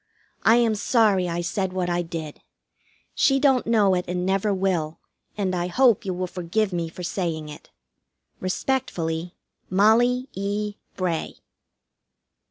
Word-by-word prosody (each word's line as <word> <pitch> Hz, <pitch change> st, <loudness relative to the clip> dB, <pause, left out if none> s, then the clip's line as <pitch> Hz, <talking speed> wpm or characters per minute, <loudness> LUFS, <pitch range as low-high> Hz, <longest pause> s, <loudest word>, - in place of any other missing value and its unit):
I 225 Hz, -, +5 dB
am 235 Hz, -2 st, +3 dB
sorry 205 Hz, -4 st, +2 dB
I 170 Hz, +1 st, -2 dB
said 185 Hz, +2 st, -2 dB
what 185 Hz, -1 st, -1 dB
I 175 Hz, 0 st, 0 dB
did. 165 Hz, -3 st, -6 dB, 0.7 s
She 270 Hz, -1 st, +3 dB
don't 270 Hz, -4 st, +3 dB
know 210 Hz, -4 st, +4 dB
it 180 Hz, -1 st, 0 dB
and 180 Hz, 0 st, -2 dB
never 195 Hz, +2 st, +1 dB
will, 185 Hz, -5 st, -1 dB, 0.4 s
and 190 Hz, -3 st, -1 dB
I 175 Hz, -1 st, -1 dB
hope 235 Hz, +2 st, +3 dB
you 190 Hz, -, -1 dB
will 185 Hz, +1 st, -2 dB
forgive 185 Hz, +3 st, -2 dB
me 170 Hz, -2 st, -2 dB
for 180 Hz, +2 st, -9 dB
saying 165 Hz, -4 st, -3 dB
it. 150 Hz, -, -11 dB, 0.7 s
Respectfully, 180 Hz, -5 st, -2 dB, 0.3 s
MOLLIE 235 Hz, +6 st, +3 dB
E. 205 Hz, +2 st, -3 dB, 0.2 s
BRAY. 175 Hz, -4 st, -2 dB
185 Hz, 140 wpm, -24 LUFS, 175-215 Hz, 0.7 s, I